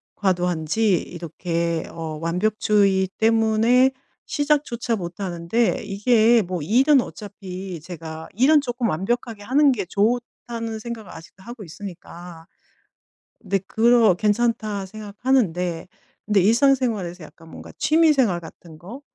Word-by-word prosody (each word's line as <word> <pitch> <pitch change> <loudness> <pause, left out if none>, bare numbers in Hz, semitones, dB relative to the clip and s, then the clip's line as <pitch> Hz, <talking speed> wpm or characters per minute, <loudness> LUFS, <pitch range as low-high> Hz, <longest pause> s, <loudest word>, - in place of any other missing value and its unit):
과도한지 180 +1 +1
이렇게 170 -1 -3
어 160 -2 -6
완벽주의 195 +2 +1
때문에 225 +3 +3 0.4
시작조차 285 -6 0
못하는데 180 +4 -2
이게 220 +3 +3
뭐 180 -2 -4
일은 265 - +4
어차피 190 -5 -8
제가 160 -1 -8
'일은 280 +7 +5
쪼끔 245 -3 -2
완벽하게 220 +5 -2
하는 280 +6 +4
게 210 -7 -2
좋다.'는 230 +1 -2
생각을 225 -3 -7
아직도 165 +3 -13
하고 235 0 -9
있으니까. 175 -1 -10 1.0
근데 195 -1 -1
그러 230 -2 +4
'괜찮다.' 210 0 0
생각하는데 200 -5 -1 0.4
근데 210 -2 +3
일상생활에서 225 - +1
약간 160 +2 -15
뭔가 - - -11
취미 320 +1 +4
생활 230 -11 +1
같은 160 -1 -13
거 205 - -10
205 Hz, 280 characters per minute, -22 LUFS, 175-235 Hz, 1.0 s, 일은